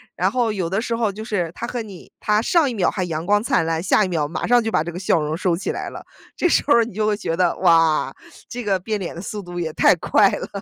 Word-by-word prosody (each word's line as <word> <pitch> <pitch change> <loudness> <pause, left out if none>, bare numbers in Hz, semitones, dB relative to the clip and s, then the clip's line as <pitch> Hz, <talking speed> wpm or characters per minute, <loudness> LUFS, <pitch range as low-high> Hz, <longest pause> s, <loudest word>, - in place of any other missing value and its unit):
然 - - +1
后 240 -4 0
有 180 -4 -2
的 195 +3 0
时 230 0 -2
候 225 -3 0
就 215 +3 -8
是 180 -7 -2
他 235 - -5
和 240 -1 -4
你 200 -5 -11
他 210 0 +2
上 295 +4 +2
一 - - -4
秒 185 - +1
还 185 - -2
阳 165 0 -4
光 205 +1 +3
灿 165 - +1
烂， 165 0 -1
下 195 +2 +3
一 - - -2
秒 160 -5 -1
马 165 - -4
上 245 -1 +4
就 225 - -2
把 155 - +1
这 170 - -5
个 175 - -7
笑 180 -3 +2
容 150 +1 -2
收 175 -1 0
起 - - -3
来 - - -5
了， - - -9 0.3
这 355 - +2
时 - - +2
候 290 - +5
儿 235 - +5
你 230 - -9
就 215 +1 0
会 210 -1 +1
觉 165 -5 -2
得， 180 -1 +1
哇， 165 -2 +3 0.3
这 245 -1 -6
个 195 -2 +1
变 210 +2 -3
脸 175 -3 -5
的 - - -7
速 210 0 -5
度 175 -1 -7
也 160 -2 -3
太 - - +4
快 195 +4 +3
了， - - -4
195 Hz, 315 characters per minute, -21 LUFS, 170-220 Hz, 0.3 s, 候